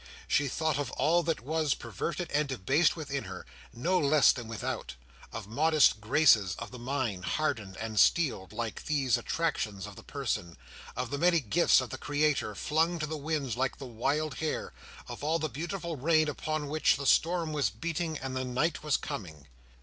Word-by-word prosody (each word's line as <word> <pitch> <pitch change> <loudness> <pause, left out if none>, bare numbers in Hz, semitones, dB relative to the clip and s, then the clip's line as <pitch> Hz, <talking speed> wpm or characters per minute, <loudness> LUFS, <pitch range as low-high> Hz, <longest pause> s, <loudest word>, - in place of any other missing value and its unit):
She 145 - +2
thought 155 +1 0
of 145 - -2
all 160 +6 +3
that 165 -5 -1
was 155 +2 0
perverted 120 - -4
and 150 0 +1
debased 135 - +2
within 140 -6 -4
her, 95 -1 -8 0.3
no 175 +10 +1
less 145 -2 +5
than 120 -3 -6
without: 105 - -4 0.4
of 110 -1 -6
modest 145 0 +3
graces 110 - +4
of - - -7
the 125 - -9
mind, 120 -7 -2
hardened 110 -9 -2
and 110 -2 -2
steeled, 125 - +3
like 115 -2 -5
these 140 -5 +2
attractions 120 - -2
of - - -10
the - - -11
person; 85 -1 -3 0.4
of 125 0 -3
the 140 - -2
many 175 0 +4
gifts 150 +4 +4
of 125 -4 -6
the - - -6
Creator 145 -7 0
flung 160 - +1
to 155 - -2
the 155 +1 -4
winds 150 -4 -2
like 130 +1 -1
the 135 - -8
wild 140 +5 -1
hair; 160 -1 -3 0.3
of - - -8
all 160 +3 +2
the 155 -2 -2
beautiful 170 +3 -4
ruin 155 +3 +3
upon 155 0 -3
which 155 0 +2
the 140 - -5
storm 165 +2 +2
was 145 -8 +1
beating 160 - -3
and 130 -1 -5
the 130 - -1
night 130 +6 -1
was 150 -2 +1
coming. 80 -7 -7
145 Hz, 185 wpm, -30 LUFS, 115-155 Hz, 0.4 s, less